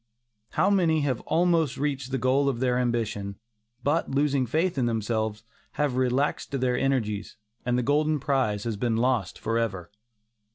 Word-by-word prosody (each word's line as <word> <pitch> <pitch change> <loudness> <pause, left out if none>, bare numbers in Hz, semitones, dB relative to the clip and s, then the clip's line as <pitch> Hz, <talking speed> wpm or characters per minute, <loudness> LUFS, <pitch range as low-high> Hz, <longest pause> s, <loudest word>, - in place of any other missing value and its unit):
How 195 - +3
many 165 -6 +3
have 135 -5 -1
almost 165 -5 +2
reached 140 -3 -2
the 135 - -1
goal 135 +3 +2
of 125 -4 -2
their 125 -1 +1
ambition, 110 -5 -1 0.5
but 150 +4 +1
losing 140 -2 +1
faith 165 +8 +1
in 120 - +2
themselves 110 -1 -1 0.3
have 145 -4 0
relaxed 130 +2 0
their 125 -1 +1
energies, 115 -7 -1 0.3
and 125 0 +2
the 125 - +1
golden 150 +3 +2
prize 130 -7 0
has 115 -3 -3
been 115 +1 0
lost 120 -6 0
forever. 110 -6 -2
130 Hz, 155 wpm, -26 LUFS, 115-145 Hz, 0.5 s, How